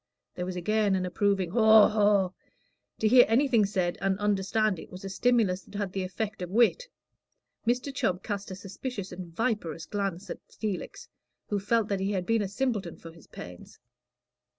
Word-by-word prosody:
There 180 0 -4
was 185 - -4
again 205 +2 +1
an 185 -1 -1
approving 190 -1 0
"Haw, 220 -1 +7
haw." 205 -3 +3 0.7
To 220 - +1
hear 245 +2 +8
anything 230 -3 +3
said, 185 -3 -1
and 195 -1 +1
understand 205 -1 +1
it, - - -11
was 185 +2 -10
a - - -4
stimulus 200 -3 +2
that 195 - -16
had 200 -2 -2
the 195 - -2
effect 205 +3 -4
of 180 - -4
wit. 240 - +3 0.8
Mr. 250 +3 0
Chubb 185 -8 -1
cast 200 -2 -4
a 185 - -6
suspicious 200 +2 -6
and 180 0 -7
viperous 190 -5 -2
glance 195 -1 -3
at - - -6
Felix, 210 -4 -5 0.4
who 205 - 0
felt 215 +2 +1
that 200 -2 0
he 195 +2 -1
had 185 -2 -2
been 225 +1 +2
a 200 - -1
simpleton 205 -5 -2
for 165 - -11
his 165 -1 -18
pains. 90 0 -11
200 Hz, 180 wpm, -28 LUFS, 185-220 Hz, 0.8 s, hear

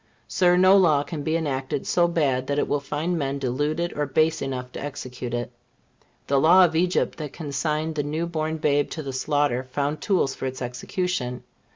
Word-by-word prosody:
Sir, 180 -1 +3
no 185 +1 +6
law 155 -7 +4
can 155 -1 -6
be 155 +3 0
enacted 135 -4 -2
so 175 -1 +3
bad 150 -6 +1
but 130 +1 -5
that 140 - -1
it - - 0
will 145 - 0
find 155 +5 -2
men 140 -1 -1
deluded 145 +6 -1
or 150 -1 -1
base 155 +3 +2
enough 125 -2 -4
to - - -7
execute 130 -4 -6
it. 120 +1 -3 0.7
The 140 0 +2
law 180 +6 +7
of 160 -2 -2
Egypt 175 0 +1
that 150 -3 -5
consigned 155 +1 -2
the 150 - -1
new 155 +3 -2
born 160 -1 -2
babe 145 -2 +1
to 155 - -5
the 135 -1 -5
slaughter 145 -2 +1
found 145 +3 -2
tools 180 -9 +1
for 135 - -4
its 130 0 -5
execution. 125 +2 -3
145 Hz, 200 wpm, -24 LUFS, 135-165 Hz, 0.7 s, law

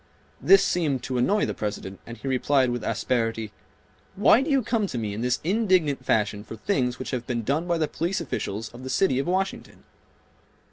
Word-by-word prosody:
This 390 - +6
seemed 145 -8 0
to 130 -1 -2
annoy 205 +12 +2
the - - -3
President 100 -2 -5
and 115 0 -8
he 135 - -7
replied 130 0 +2
with 120 -2 -3
asperity, 115 -1 -1 0.6
"Why 210 +4 +5
do 280 - -2
you 275 -3 +3
come 215 -2 0
to 125 - -5
me 110 -3 -3
in 105 - -4
this 125 0 0
indignant 180 - +2
fashion 105 -3 0
for 110 - -9
things 125 - -1
which 130 - -6
have 125 -2 -3
been 120 -2 -2
done 150 +9 -1
by 170 -1 +1
the 155 -2 0
police 170 +6 -2
officials 110 - -4
of 120 - -12
the 130 - -6
city 130 -4 +2
of 140 - -2
Washington?" 190 +2 -2
130 Hz, 200 wpm, -25 LUFS, 115-180 Hz, 0.6 s, This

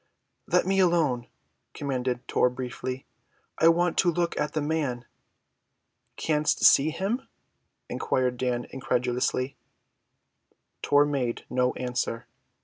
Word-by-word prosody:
"Let - - +3
me 195 +1 +1
alone," 160 -10 +2 0.5
commanded 130 -3 -2
Tor 125 - +3
briefly. 125 +1 -5 0.5
"I 160 - +6
want 175 +1 +3
to 180 - +4
look 170 +1 -1
at 150 - -2
the 155 - 0
man." 145 -5 -2 1.1
"Canst 150 -1 +1
see 140 +3 +6
him?" 200 - -2 0.6
inquired 125 -1 -1
Dan 125 -1 -1
incredulously. 125 +1 -1 1.2
Tor 145 0 +4
made 135 -5 -2
no 125 0 +2
answer. 125 -2 -3
130 Hz, 110 wpm, -27 LUFS, 125-160 Hz, 1.2 s, I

